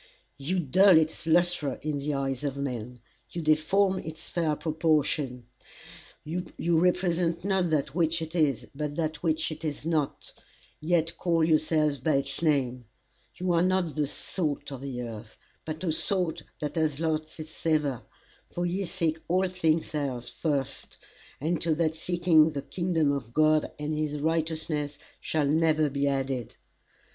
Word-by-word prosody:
You 175 +7 -1
dull 180 +4 +6
its 160 +1 0
lustre 170 -4 +3
in 150 -2 -1
the 145 +1 -2
eyes 135 0 -2
of 140 -1 -2
men; 125 -3 -4 0.3
you 175 - -5
deform 180 +5 +2
its 160 0 -8
fair 165 -3 +1
proportions; 150 -4 0 0.8
you 170 0 -1
represent 175 -1 +1
not 190 -3 +2
that 150 -3 0
which 165 0 +1
it 160 0 -6
is, 140 -8 +1
but 145 +1 -4
that 160 -1 -2
which 160 -1 0
it 155 +1 -8
is 150 -1 -4
not, 155 -4 -1 0.5
yet 165 0 +1
call 170 -3 +1
yourselves 155 -2 +2
by 155 +4 +1
its 135 +1 -2
name; 130 -6 +1 0.5
you 180 0 0
are 170 - +3
not 185 -3 +1
the 150 -2 0
salt 150 -1 -3
of 135 -2 -7
the 130 -3 -4
earth, 110 -2 -8 0.3
but 155 +2 -5
a 170 - +1
salt 170 -1 +2 0.2
that 150 +1 -3
has 155 -3 +1
lost 160 0 -2
its 155 0 -7
savour, 150 -6 0 0.5
for 175 - -3
ye 185 +3 -1
seek 165 -3 -1
all 185 +2 +2
things 165 -4 0
else 135 -5 -2
first, 140 -4 -2 0.4
and 160 +3 -1
to 165 -2 +2
that 160 -1 +1
seeking 165 -1 +3
the 145 -3 -5
kingdom 165 -3 0
of 130 -5 -4
God 155 +1 +3
and 150 +1 -3
his 150 -1 -2
righteousness 155 -2 -1 0.2
shall 155 -2 0
never 155 0 +2
be 140 +1 0
added. 135 -3 -2
155 Hz, 155 wpm, -28 LUFS, 145-170 Hz, 0.8 s, dull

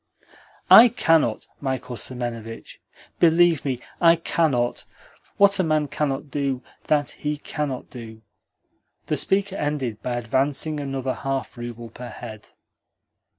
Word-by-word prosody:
"I 235 - +11
cannot, 165 - +2
Michael 130 -2 -3
Semenovitch. 115 -2 -5 0.4
Believe 170 -2 +4
me, 130 -3 -2 0.2
I 165 -1 +7
cannot. 150 -7 0 0.5
What 200 0 +5
a - - +4
man 155 -3 +1
cannot 145 -1 -2
do, 140 -3 -2 0.2
that 145 -2 +1
he 150 0 -3
cannot 145 -3 -4
do." 110 -3 -10 0.8
The - - -1
speaker 195 0 0
ended 140 -7 -2
by 125 - -2
advancing 135 +5 0
another 135 -2 -3
half 135 -3 -4
rouble 120 -1 -8
per 125 0 -9
head. 110 -2 -10
135 Hz, 120 wpm, -23 LUFS, 120-155 Hz, 0.8 s, I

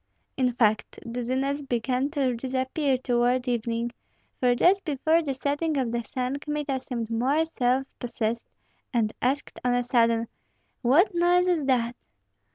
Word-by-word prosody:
In 255 -2 +2
fact, 220 -3 +1
dizziness 260 +4 -1
began 255 +1 -1
to 275 -5 0
disappear 260 +3 -1
toward 245 0 +1
evening; 235 0 -1 0.5
for 245 -1 +3
just 385 +9 +4
before 315 +2 +2
the 280 -4 -3
setting 290 +4 -1
of 255 -4 0
the 235 0 -1
sun 255 +3 -3
Kmita 295 -2 -2
seemed 235 -3 -5
more 270 +8 +2
self 260 -4 0
possessed 235 -2 -3 0.4
and 225 -4 +1
asked 270 +4 -1
on 245 0 +2
a 245 - +1
sudden, 230 -2 +2 0.5
"What 300 - +4
noise 350 +1 +3
is 335 -5 +1
that?" 245 -3 +1
255 Hz, 145 wpm, -26 LUFS, 240-285 Hz, 0.5 s, just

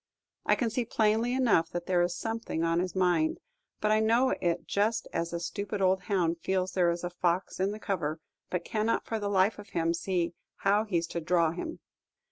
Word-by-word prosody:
I - - +5
can 235 -3 -1
see 245 +2 0
plainly 225 +2 +1
enough 225 -11 +3
that 175 -1 -4
there 180 -2 +2
is 175 0 0
something 225 -7 -3
on 165 0 +2
his 185 +1 -2
mind; 175 -4 +2 0.4
but 215 - +1
I 215 - +4
know 230 +4 +3
it 170 -1 0
just 215 +2 0
as 170 0 -1
a 170 - -2
stupid 200 +4 -4
old 190 -1 +3
hound 175 -4 +1
feels 185 +1 0
there 180 -2 +3
is 170 +1 -2
a 175 - -3
fox 175 +1 -1
in 190 +1 +2
the 210 - -4
cover, 165 -7 -2 0.3
but 180 -1 -2
cannot 220 +1 0
for 225 - -2
the 205 -1 -2
life 200 +2 +2
of 205 0 -11
him 165 0 0
see 170 0 -1 0.2
how 205 +2 +2
he's 170 -5 0
to 170 - -3
"draw" 170 -1 +2
him. 320 - -6
185 Hz, 210 wpm, -29 LUFS, 170-215 Hz, 0.4 s, I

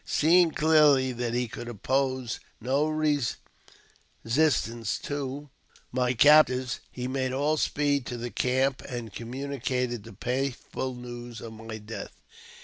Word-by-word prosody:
Seeing 170 +2 +4
clearly 150 -5 +4
that 120 -1 -2
he 125 0 0
could 120 - -8
oppose 130 +2 -1 0.2
no 135 +6 +1
resistance 150 -5 0 1.6
toj 145 0 -4 0.4
my 125 0 +1
captors, 130 -3 +5
he 125 0 -4
made 130 0 -1
all 145 +3 +1
speed 145 -3 0
to 120 - -4
the 120 0 -5
camp, 130 +1 +1
and 120 -4 -5
communicated 125 -1 -3
I 115 - -12
the - - -12
painful 130 +1 -3
news 120 -1 -8
of 115 -1 -8
my 110 0 -7
death. 110 -1 -8
130 Hz, 130 wpm, -27 LUFS, 120-140 Hz, 1.6 s, captors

